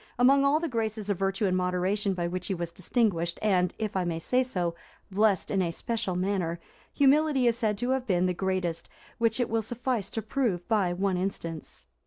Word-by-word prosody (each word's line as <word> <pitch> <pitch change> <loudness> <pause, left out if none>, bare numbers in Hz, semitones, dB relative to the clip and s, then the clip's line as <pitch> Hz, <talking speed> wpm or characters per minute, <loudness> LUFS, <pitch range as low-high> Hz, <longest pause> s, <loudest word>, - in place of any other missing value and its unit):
Among 270 +3 +5
all 280 +2 +4
the 335 - -2
graces 220 -5 -2
of 195 - -2
virtue 195 +2 0
and 185 -2 +2
moderation 185 +2 0
by 175 -1 -1
which 180 0 -4
he 195 - -1
was 170 -1 -4
distinguished 175 -3 0
and, 185 -4 +2
if 215 -3 -3
I 190 - +1
may 170 -2 -2
say 250 +10 +1
so, 180 -9 -1 0.4
blessed 205 -1 +2
in 195 - +2
a 175 - 0
special 205 0 -2
manner, 180 -2 -1 0.3
humility 285 -1 +3
is 235 -1 +4
said 210 -2 +1
to 245 +4 -1
have 260 -1 -1
been 180 -3 +2
the 180 - +1
greatest, 185 -2 -2 0.3
which 230 +1 +2
it 245 - +1
will 225 0 0
suffice 235 -2 -2
to 225 - -4
prove 215 -7 -1
by 205 -6 +2
one 185 +1 0
instance. 170 -4 -4
200 Hz, 205 wpm, -28 LUFS, 180-230 Hz, 0.4 s, Among